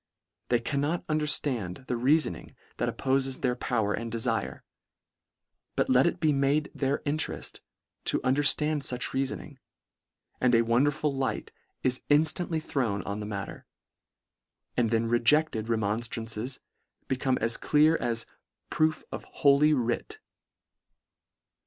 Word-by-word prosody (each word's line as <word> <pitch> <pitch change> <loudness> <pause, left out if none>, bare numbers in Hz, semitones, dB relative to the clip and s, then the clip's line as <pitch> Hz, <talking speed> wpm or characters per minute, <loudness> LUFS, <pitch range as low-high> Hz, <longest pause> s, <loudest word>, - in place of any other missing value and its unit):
They 120 - +3
cannot 145 +7 -1
understand 140 - 0
the - - -1
reafoning 125 - +1 0.2
that - - 0
oppofes 135 0 -1
their 125 -2 +1
power 110 -4 0
and 115 0 -4
defire: 115 0 -2 1.1
but - - +1
let 130 +4 +5
it 170 - -1
be 155 -2 +3
made 140 +2 +1
their 140 0 -1
intereSt 150 +2 -2 0.5
to - - +1
understand 145 +3 +3
fuch 125 -2 -1
reafoning 135 +1 -3 0.4
— - - -47
and 125 -1 +4
a 115 - +5
wonderful 140 +5 +1
light 130 -5 -2 0.3
is 130 0 +1
inStantly 160 +2 +2
thrown 115 -10 -1
on 100 +1 -4
the 105 - -5
matter; 100 -2 -6 1.1
and 120 -2 +2
then 115 0 +1
rejected 120 0 +2
remonStran 115 +1 -1
ces 115 +4 -2 0.5
become 130 0 0
as 115 +1 0
clear 155 +2 +4
as 115 -1 -2 0.2
" - - -57
proof 155 0 +1
of - - -5
holy 140 +2 +4
writ." 125 - -2
130 Hz, 130 wpm, -28 LUFS, 115-150 Hz, 1.1 s, let